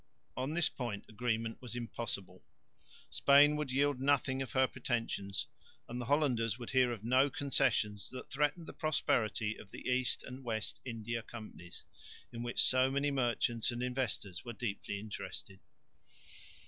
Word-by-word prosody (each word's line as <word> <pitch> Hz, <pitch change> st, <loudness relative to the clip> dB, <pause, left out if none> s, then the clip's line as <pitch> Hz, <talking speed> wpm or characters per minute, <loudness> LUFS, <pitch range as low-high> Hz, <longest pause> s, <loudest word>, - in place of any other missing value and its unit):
On 130 Hz, +5 st, -2 dB
this 175 Hz, -2 st, +4 dB
point 120 Hz, -6 st, -4 dB
agreement 115 Hz, 0 st, -2 dB
was 120 Hz, -2 st, -6 dB
impossible. 105 Hz, -6 st, -4 dB, 0.7 s
Spain 145 Hz, +2 st, +6 dB
would 150 Hz, -3 st, -2 dB
yield 140 Hz, 0 st, +2 dB
nothing 135 Hz, -1 st, +2 dB
of 130 Hz, -, -4 dB
her 130 Hz, 0 st, +5 dB
pretensions; 115 Hz, -6 st, -2 dB, 0.4 s
and 120 Hz, +1 st, -4 dB
the -, -, -4 dB
Hollanders 125 Hz, -6 st, +2 dB
would 120 Hz, -2 st, -6 dB
hear 130 Hz, -2 st, +4 dB
of 110 Hz, -4 st, -5 dB
no 130 Hz, +4 st, +4 dB
concessions 120 Hz, -8 st, +1 dB
that 130 Hz, 0 st, -8 dB
threatened 150 Hz, +4 st, +1 dB
the -, -, -8 dB
prosperity 110 Hz, -8 st, +1 dB
of 100 Hz, -, -12 dB
the -, -, -8 dB
East 125 Hz, -1 st, +1 dB
and 130 Hz, +1 st, -8 dB
West 110 Hz, -3 st, -3 dB
India 115 Hz, -1 st, -3 dB
Companies 110 Hz, -6 st, -9 dB, 0.5 s
in 115 Hz, -, -5 dB
which 120 Hz, 0 st, +1 dB
so 130 Hz, 0 st, +5 dB
many 140 Hz, +1 st, +1 dB
merchants 120 Hz, -3 st, +1 dB
and 120 Hz, 0 st, -2 dB
investors 125 Hz, -7 st, -2 dB
were 120 Hz, -, -6 dB
deeply 100 Hz, -3 st, -3 dB
interested. 100 Hz, -2 st, -6 dB
120 Hz, 150 wpm, -34 LUFS, 110-135 Hz, 0.7 s, Spain